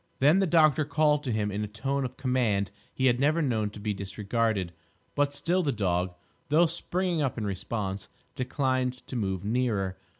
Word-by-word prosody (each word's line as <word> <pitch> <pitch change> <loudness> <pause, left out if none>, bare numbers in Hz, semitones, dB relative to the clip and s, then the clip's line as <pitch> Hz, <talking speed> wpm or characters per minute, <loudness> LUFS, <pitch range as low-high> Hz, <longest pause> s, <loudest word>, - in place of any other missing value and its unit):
Then 150 +8 +5
the 195 - +2
doctor 155 -3 +4
called 150 0 +2
to 125 - -1
him 105 -2 0
in 105 +2 -2
a - - -3
tone 135 +6 -2
of 125 - -7
command 120 -7 +1 0.2
he 130 - -1
had 125 -1 +4
never 150 +4 +3
known 115 -9 0
to 105 - -11
be 105 0 -2
disregarded; 100 -1 -1 0.4
but 145 -1 +1
still 165 +6 0
the 150 -5 +1
dog, 90 -5 0 0.3
though 160 +4 +5
springing 175 +1 -1
up 135 -4 -1
in 110 - -2
response, 100 0 -3 0.2
declined 130 -1 -1
to - - -7
move 95 -4 -2
nearer. 105 -5 0
125 Hz, 185 wpm, -28 LUFS, 105-145 Hz, 0.4 s, Then